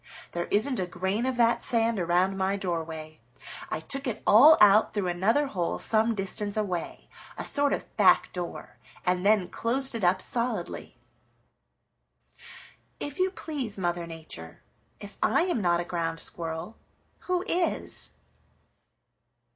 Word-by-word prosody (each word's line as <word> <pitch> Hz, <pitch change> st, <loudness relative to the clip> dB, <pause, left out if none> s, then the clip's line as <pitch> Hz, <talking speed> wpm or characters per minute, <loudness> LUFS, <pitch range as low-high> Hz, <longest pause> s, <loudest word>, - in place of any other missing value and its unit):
"There 175 Hz, 0 st, -3 dB
isn't 250 Hz, +6 st, +1 dB
a 185 Hz, -, -1 dB
grain 190 Hz, +7 st, -2 dB
of 260 Hz, -1 st, -2 dB
that 235 Hz, -1 st, +3 dB
sand 230 Hz, -3 st, +3 dB
around 180 Hz, +2 st, +1 dB
my 195 Hz, +1 st, 0 dB
doorway. 160 Hz, -4 st, -5 dB, 0.5 s
I -, -, -3 dB
took 275 Hz, -, -4 dB
it 230 Hz, -3 st, -4 dB
all 290 Hz, +9 st, +8 dB
out 210 Hz, +2 st, +5 dB
through 195 Hz, -3 st, 0 dB
another 210 Hz, +11 st, +2 dB
hole 180 Hz, -10 st, -2 dB
some 225 Hz, +1 st, +2 dB
distance 200 Hz, +1 st, -2 dB
away, 185 Hz, -5 st, -3 dB, 0.3 s
a -, -, -4 dB
sort 285 Hz, -1 st, +2 dB
of -, -, -4 dB
back -, -, +4 dB
door, 175 Hz, -1 st, -7 dB, 0.3 s
and 180 Hz, 0 st, +1 dB
then 205 Hz, -3 st, +3 dB
closed 260 Hz, +8 st, -1 dB
it 230 Hz, -4 st, -4 dB
up 180 Hz, +1 st, +3 dB
solidly. 240 Hz, +5 st, -4 dB, 2.0 s
If 290 Hz, +2 st, -6 dB
you 370 Hz, +1 st, +3 dB
please, 290 Hz, -, -5 dB
Mother 175 Hz, -2 st, -2 dB
Nature, 160 Hz, -, -10 dB, 0.4 s
if 205 Hz, -1 st, -11 dB
I -, -, +3 dB
am 350 Hz, -, -1 dB
not 175 Hz, -2 st, +2 dB
a 175 Hz, -, -3 dB
Ground 165 Hz, -2 st, -3 dB
Squirrel, 165 Hz, +6 st, -4 dB, 0.5 s
who 365 Hz, 0 st, 0 dB
is?" 345 Hz, 0 st, -1 dB
200 Hz, 140 wpm, -27 LUFS, 175-235 Hz, 2.0 s, all